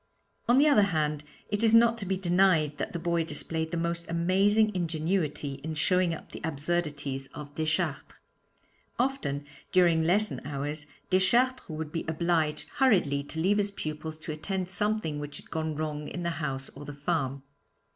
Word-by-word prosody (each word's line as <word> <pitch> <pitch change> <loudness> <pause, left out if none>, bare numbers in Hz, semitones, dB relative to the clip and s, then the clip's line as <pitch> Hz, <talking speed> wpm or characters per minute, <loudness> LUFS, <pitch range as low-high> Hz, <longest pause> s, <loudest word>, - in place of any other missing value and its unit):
On 245 - +6
the 290 +3 +6
other 285 -8 +6 0.2
hand, 150 -1 0 0.3
it 205 +2 -1
is 225 0 +5
not 230 0 +6
to 195 - -5
be 190 0 0
denied 175 -5 +3
that - - -2
the - - -3
boy 170 0 0
displayed 160 0 -1
the 170 - -3
most 170 0 -2
amazing 195 +6 +3
ingenuity 160 -4 -1
in 160 0 -4
showing 180 +3 +3
up 165 - -7
the - - -8
absurdities 145 -3 -2
of 145 -1 -8
Deschartres. 155 -1 -1 0.8
Often, 240 - -1 0.3
during 175 -3 +4
lesson 205 +6 +2
hours, 145 +2 -3 0.2
Deschartres 235 +7 +3
would 155 -1 -5
be 165 - -2
obliged 160 -1 0
hurriedly 180 - +3
to 160 - -6
leave 195 +5 +3
his 205 0 +2
pupils 155 -4 -5
to 155 - -6
attend 185 +4 -3
to - - -11
something 205 -7 0
which 145 0 -5
had - - -12
gone 160 -1 -2
wrong 150 -1 -3
in 175 - -5
the 170 - 0
house 140 -4 -4
or 140 - -10
the 145 0 -7
farm. 140 -2 -2
165 Hz, 175 wpm, -28 LUFS, 150-190 Hz, 0.8 s, On